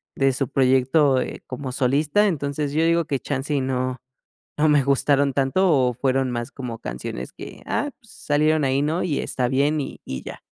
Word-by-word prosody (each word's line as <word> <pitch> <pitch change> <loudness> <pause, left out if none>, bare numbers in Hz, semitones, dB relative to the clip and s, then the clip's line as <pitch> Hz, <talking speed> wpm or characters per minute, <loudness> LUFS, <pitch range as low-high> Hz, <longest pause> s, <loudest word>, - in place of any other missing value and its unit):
de 135 0 +3
su 135 0 -1
proyecto, 135 +1 +3
eh, - - -4
como 130 0 -5
solista. 145 +10 +2
Entonces, 145 -4 -2
yo 160 +2 +2
digo 170 0 +2
que 140 -3 -1
chance 140 +2 -4
y 140 - +2
no 130 -1 -1 0.6
no 155 +1 +3
me 150 -3 +4
gustaron 140 +1 +2
tanto, 140 +8 +2
o 130 -4 +3
fueron 130 +1 0
más 120 +1 -4
como 120 -4 -6
canciones 60 +1 -6
que, - - -11
ah, 290 - -1
pues, 225 -2 -17
salieron 150 0 +1
ahí, 135 +1 +1
¿no?, 155 +5 0
y 155 -6 -1
está 125 -2 -1
bien 140 +4 +1
y 140 - -6
y 65 - -6
ya. - - -8
140 Hz, 195 wpm, -23 LUFS, 130-150 Hz, 0.6 s, me